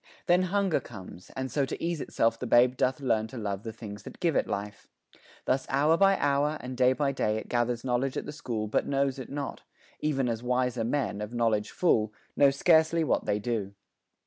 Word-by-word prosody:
Then 175 +1 +4
hunger 195 -3 +1
comes; 95 -5 -11
and 130 0 -3
so 145 - +1
to 135 - -4
ease 170 -3 -2
Itself 115 0 0
the 125 - -4
babe 125 +2 +5
doth 130 +3 0
learn 110 -4 +1
to 125 - -9
love 100 -3 -3
the 110 0 -6
things 105 -2 -9
That - - -11
give 170 -5 +1
it - - +2
life. 100 0 -5 0.6
Thus 130 +1 0
hour 145 +4 +3
by 195 +2 +4
hour, 145 +2 +1
and 130 0 -6
day 125 +1 +4
By 140 0 0
day 110 -5 0
it 110 - -6
gathers 120 -1 0
knowledge 130 +1 0
at - - -3
the - - -5
school 115 -7 -4
But 105 - 0
knows 140 -1 0
it 130 - -7
not 140 -1 -5 0.4
even 135 -4 0
as 115 -1 -2
wiser 125 -1 0
men, 115 -4 -1
Of 105 +3 -6
knowledge 110 -3 +1
full, 110 -12 +2 0.2
know 140 - +6
scarcely 160 +3 +3
what - - 0
they 105 - +2
do. 105 -2 -3
125 Hz, 210 wpm, -28 LUFS, 110-145 Hz, 0.6 s, know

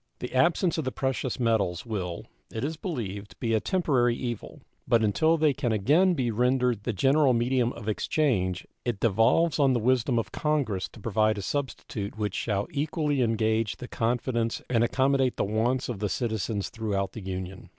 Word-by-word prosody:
The 125 - -6
absence 170 +5 +2
of - - -1
the 130 - -2
precious 130 -1 -2
metals 110 -7 +1
will, 90 -7 -4 0.3
it 110 - -4
is 155 +3 -2
believed, 105 - -5
be 115 -2 0
a 110 - +3
temporary 130 - +1
evil, 120 -3 -6 0.2
but 115 -1 +3
until 155 +11 +3
they 155 -2 +3
can 130 -3 -1
again 150 - +3
be 125 -5 0
rendered 125 -1 +1
the 120 - 0
general 135 - +3
medium 120 +1 +1
of 105 - -9
exchange 105 - 0 0.2
it 120 -5 -2
devolves 115 - +3
on 135 -2 +4
the 120 - +1
wisdom 125 +1 +2
of 115 - -2
Congress 140 -11 -1
to - - -12
provide 110 0 +1
a 100 - -4
substitute 110 -5 -4
which 105 -3 -2
shall 100 -3 -1
equally 145 -1 0
engage 110 -3 +1
the 125 - -8
confidence 115 0 -1
and 115 -2 +3
accommodate 130 +1 +2
the - - +1
wants 115 +5 0
of 120 -5 -4
the 105 0 -1
citizens 110 -1 -2
throughout 100 -4 -2
the 110 - -8
Union. 95 0 -6
120 Hz, 180 wpm, -27 LUFS, 105-135 Hz, 0.3 s, on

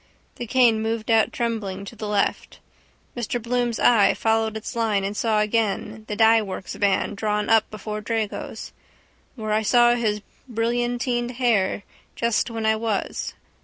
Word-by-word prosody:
The 240 - -5
cane 235 -3 +4
moved 225 0 -2
out 225 -1 +4
trembling 210 -5 -3
to 215 - -9
the 215 -1 -5
left. 205 -1 -1 0.6
Mr 240 0 -2
Bloom's 240 0 -1
eye 225 -5 +5
followed 220 -1 0
its 220 - -7
line 220 -4 +1
and 200 +1 -3
saw 215 -1 +1
again 215 0 -1
the 210 - -3
dyeworks' 220 -4 +2
van 200 -1 +1
drawn 210 0 -1
up 225 -1 +4
before 215 0 -6
Drago's. 220 -1 -4 0.6
Where 215 -3 -4
I 215 - +2
saw 240 +2 +5
his 215 -3 -1 0.3
brillantined 240 +1 -1
hair 225 -6 +1 0.3
just 235 0 0
when 225 -1 -4
I 220 0 +3
was. 220 -3 -3
220 Hz, 150 wpm, -23 LUFS, 210-235 Hz, 0.6 s, eye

